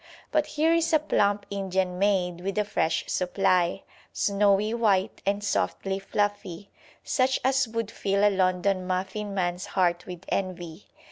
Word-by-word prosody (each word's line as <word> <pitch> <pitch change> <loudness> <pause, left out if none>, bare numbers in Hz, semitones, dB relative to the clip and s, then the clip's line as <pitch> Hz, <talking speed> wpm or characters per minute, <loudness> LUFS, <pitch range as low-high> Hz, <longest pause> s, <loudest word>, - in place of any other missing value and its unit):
But 305 -1 +1
here 310 +2 +2
is 335 0 +1
a - - +8
plump 205 -8 +1
Indian 190 -2 -1
maid 180 -3 +1
with 195 +2 -4
a 210 - +2
fresh 165 -5 0
supply, 180 0 +1 0.3
snowy 200 +1 +2
white 205 -5 +1
and 200 +1 0
softly 195 -1 -1
fluffy, 205 -2 -3 0.3
such 260 0 +1
as 270 -1 +2
would 225 -1 -3
fill 200 0 0
a 205 - +2
London 185 0 +1
muffin 190 +2 -3
man's 180 0 -2
heart 175 -2 +1
with 180 0 -8
envy. 180 -2 -4
195 Hz, 145 wpm, -26 LUFS, 185-210 Hz, 0.3 s, a